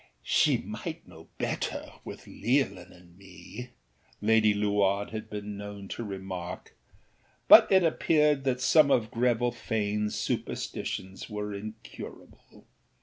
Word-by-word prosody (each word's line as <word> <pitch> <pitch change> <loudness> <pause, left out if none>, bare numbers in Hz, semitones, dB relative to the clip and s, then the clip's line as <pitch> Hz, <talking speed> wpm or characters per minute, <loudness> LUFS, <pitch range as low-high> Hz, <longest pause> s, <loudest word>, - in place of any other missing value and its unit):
âShe - - +3
might - - -6
know - - -14
better, - - -3
with - - -9
Leolin 120 -6 -1
and 85 -1 -18
me,â 95 +6 -10 0.5
Lady 110 0 +4
Luard 100 -1 +1
had 110 -1 -6
been 105 0 -5
known 100 -1 -8
to 120 - -4
remark; 95 -3 -6 0.7
but - - +9
it 190 -1 +6
appeared 150 -3 +3
that 130 -2 0
some 150 +3 +5
of 115 -5 +2
Greville 120 0 +1
Faneâs 105 -2 -2
superstitions 95 +3 -4
were 105 -1 -4
incurable. 110 +2 -10
105 Hz, 120 wpm, -28 LUFS, 100-120 Hz, 0.7 s, but